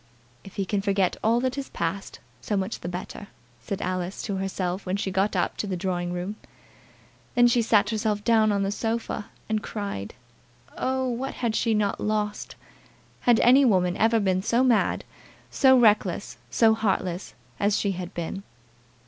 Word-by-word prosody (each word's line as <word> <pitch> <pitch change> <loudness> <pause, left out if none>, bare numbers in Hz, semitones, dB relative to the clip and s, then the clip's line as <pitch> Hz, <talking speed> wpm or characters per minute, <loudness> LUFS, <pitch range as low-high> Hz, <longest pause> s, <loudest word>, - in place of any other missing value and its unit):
"If 195 - -13
he 195 - -1
can 200 +1 -1
forget 195 -2 +1
all 230 +2 +3
that 260 0 0
has 275 - -4
passed, 170 +4 -4 0.2
so 205 - -1
much 195 +3 -2
the - - -6
better," 180 +3 -7 0.3
said 190 - -5
Alice 185 +1 -3
to 200 -3 -2
herself 190 -1 -2
when 185 +1 -2
she 195 -1 -2
got 195 +2 +1
up 175 - +1
into 210 - -5
the 185 -2 -2
drawing 175 -1 -2
room. 180 +4 -4 1.0
Then 245 -1 +6
she 240 0 +3
sat 215 -1 +3
herself 215 -1 -1
down 220 -1 +4
on 200 -1 +1
the 195 - -1
sofa, 225 -1 -3 0.2
and 215 -1 0
cried. 200 - -5 0.6
Oh! 260 0 -1
what 250 +2 -3
had 235 -3 -1
she 225 -1 +1
not 205 -1 0
lost! 210 -1 -2 0.6
Had 240 -2 +4
any 260 +3 +6
woman 180 -7 +3
ever 225 +1 +3
been 190 -2 +1
so 235 +5 +2
mad, 245 -4 +2 0.5
so 260 -1 +5
reckless, 210 -5 +2
so 225 -1 +4
heartless 190 -4 -2 0.2
as 205 0 +2
she 200 - 0
had 180 -1 -5
been! 175 +3 -4
205 Hz, 175 wpm, -25 LUFS, 190-225 Hz, 1.0 s, Then